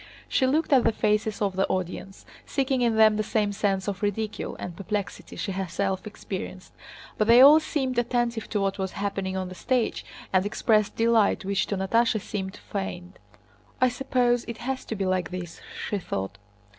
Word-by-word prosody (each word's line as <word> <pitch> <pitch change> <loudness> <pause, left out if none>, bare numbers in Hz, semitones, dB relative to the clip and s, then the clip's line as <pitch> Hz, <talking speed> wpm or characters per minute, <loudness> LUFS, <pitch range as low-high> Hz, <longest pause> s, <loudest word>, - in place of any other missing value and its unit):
She 260 - +2
looked 300 +3 +2
at 260 - +6
the - - +4
faces 215 0 0
of 195 -2 0
the 190 - +1
audience, 185 +1 -4 0.2
seeking 265 -2 0
in 235 -2 +2
them 215 -1 +6
the - - +1
same 210 -1 0
sense 195 -1 0
of 200 -1 -3
ridicule 210 +1 -2
and 175 - -6
perplexity 200 +1 -4
she 195 - -3
herself 190 +1 -2
experienced, 190 -2 -7 0.5
but 215 - +2
they 235 +1 +8
all 290 +4 +9
seemed 265 -6 -1
attentive 240 -1 -1
to 210 - 0
what 195 0 -1
was 190 -1 -2
happening 195 -2 -2
on 185 -1 -2
the - - -7
stage, 245 +5 -1 0.3
and 185 -1 +4
expressed 210 0 +1
delight 225 -3 +3
which 195 0 0
to 200 - -2
Natásha 225 +4 +2
seemed 190 -1 -5
feigned. 185 -2 -6 0.6
"I 255 -1 +5
suppose 245 -1 +1
it 235 - -6
has 265 0 -3
to 225 - -4
be 195 -2 -2
like 185 -2 0
this!" 180 -2 -7 0.3
she 205 - -1
thought. 95 - -4
205 Hz, 180 wpm, -26 LUFS, 190-235 Hz, 0.6 s, all